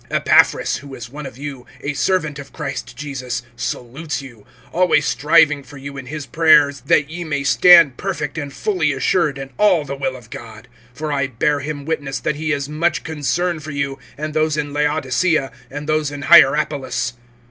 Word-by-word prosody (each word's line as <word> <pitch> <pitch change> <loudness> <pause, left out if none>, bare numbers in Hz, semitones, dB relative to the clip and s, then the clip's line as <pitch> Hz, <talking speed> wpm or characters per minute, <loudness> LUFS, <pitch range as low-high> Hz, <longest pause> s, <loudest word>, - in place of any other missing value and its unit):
(12)Epaphras, - - +3
who 140 -1 -10
is 120 -2 -9
one 150 0 -7
of 120 - -12
you, 135 -3 -7
a 145 - -3
servant 155 -2 0
of 140 0 -10
Christ 135 -2 -6
Jesus, 130 -4 -5
salutes 135 +6 -4
you, 120 -6 -13 0.3
always 160 -4 +3
striving 150 -1 +3
for 140 +1 -13
you 140 +1 -8
in 135 -2 -8
his 150 +1 -6
prayers, 150 -4 +4
that 145 0 +3
ye 175 +1 -5
may 145 -4 -2
stand 165 -3 +6
perfect 180 -7 -3
and 145 -3 -5
fully 170 -4 0
assured 145 +2 +1
in 135 0 -7
all 185 -8 +4
the 140 0 -5
will 135 -1 -2
of 120 -3 -14
God. 110 -1 -10 0.3
(13)For 150 -1 -3
I 140 -2 0
bear 145 +4 0
him 145 0 -5
witness, 145 -4 -3
that 150 - -2
he 155 +1 -3
has 140 -3 -1
much 155 +3 -1
concern[4:13] 160 +2 -2
for 150 - -8
you, 140 -2 -3 0.2
and 155 +1 -4
those 155 -1 +1
in 145 -1 -3
Laodicea, 150 0 +1 0.2
and 145 +2 -7
those 155 -1 +1
in 145 0 -7
Hierapolis. 145 -4 +4
145 Hz, 185 wpm, -19 LUFS, 135-155 Hz, 0.3 s, stand